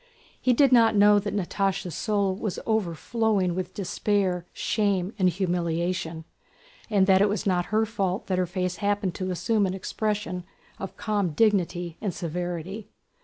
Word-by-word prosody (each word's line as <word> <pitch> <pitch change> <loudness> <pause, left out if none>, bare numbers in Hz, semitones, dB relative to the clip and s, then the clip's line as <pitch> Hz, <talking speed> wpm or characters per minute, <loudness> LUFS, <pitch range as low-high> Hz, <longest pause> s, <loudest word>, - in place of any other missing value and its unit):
He 255 - +3
did 275 +2 +4
not 230 -3 +5
know 205 0 +6
that 205 - -4
Natásha's 195 -2 -1
soul 200 0 0
was 205 -1 -3
overflowing 215 -1 0
with 185 0 -4
despair, 190 -2 0
shame, 200 -2 0
and 185 -1 +4
humiliation, 170 -2 -2 0.6
and 200 -3 +4
that 190 0 +5
it 205 - +4
was 205 +2 -2
not 180 -3 +1
her 220 +1 +2
fault 195 -4 -2
that 185 -1 0
her 180 - +1
face 180 0 -2
happened 205 -3 0
to 185 -1 -4
assume 200 +3 +1
an 185 - -3
expression 205 -2 -2 0.4
of 195 - -7
calm 205 -6 -1
dignity 180 -4 +1
and 195 -6 -2
severity. 175 +4 -4
190 Hz, 155 wpm, -26 LUFS, 180-210 Hz, 0.6 s, know